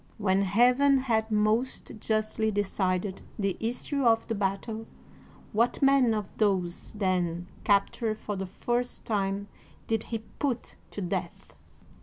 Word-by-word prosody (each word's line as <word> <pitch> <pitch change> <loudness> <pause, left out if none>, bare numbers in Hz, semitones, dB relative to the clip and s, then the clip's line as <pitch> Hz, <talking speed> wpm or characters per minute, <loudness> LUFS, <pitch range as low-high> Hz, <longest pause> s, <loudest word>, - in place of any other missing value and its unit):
When 195 -2 +2
Heaven 250 +8 +4
had 225 -4 +1
most 215 +4 +1
justly 215 0 0
decided 195 -2 -1 0.2
the 195 -3 0
issue 250 +5 -2
of 225 -2 +3
the 225 - -1
battle, 210 +2 -2 0.7
what 230 +3 +2
man 270 -4 +5
of 210 -2 -2
those 185 -5 0
then 180 -4 0 0.2
captured 215 +2 +2
for 210 -1 -4
the 190 0 -3
first 240 +6 -2
time 200 -1 -1 0.4
did 225 -1 0
he 230 - -2
put 240 +3 -4
to 205 - -6
death 175 - -4
215 Hz, 130 wpm, -28 LUFS, 195-230 Hz, 0.7 s, man